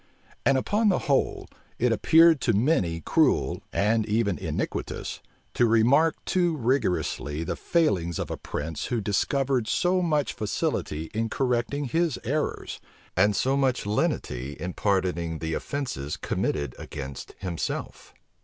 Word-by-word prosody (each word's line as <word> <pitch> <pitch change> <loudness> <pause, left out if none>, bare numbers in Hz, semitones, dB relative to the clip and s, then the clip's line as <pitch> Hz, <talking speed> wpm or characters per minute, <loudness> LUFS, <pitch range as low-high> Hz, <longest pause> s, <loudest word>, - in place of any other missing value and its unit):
And 135 -1 +5
upon 210 - +2
the 185 - +3
whole, 140 -2 +1 0.3
it 125 0 +2
appeared 160 +6 +5
to 115 - +2
many 100 - +1
cruel, - - +2
and 110 +2 +2
even 105 -6 +1
iniquitous, - - -3 0.3
to 120 - +3
remark 125 +8 +4
too 175 -3 +1
rigorously 115 - 0
the - - -3
failings 95 - +1
of - - -3
a - - -1
prince 80 +2 -5
who 120 - 0
discovered 125 +4 0
so 180 +1 +2
much 150 -5 +1
facility 80 -7 -2
in 115 +1 -1
correcting 125 +3 0
his 165 +2 0
errors, 150 +5 -2 0.4
and 100 +3 +4
so 135 +6 +1
much 130 -5 +1
lenity 70 - -1
in 90 +3 -5
pardoning 90 -5 0
the 80 0 -3
offences 80 - -3
committed 70 -4 -2
against 70 -2 -7
himself. 90 -3 -4
115 Hz, 135 wpm, -26 LUFS, 90-140 Hz, 0.4 s, And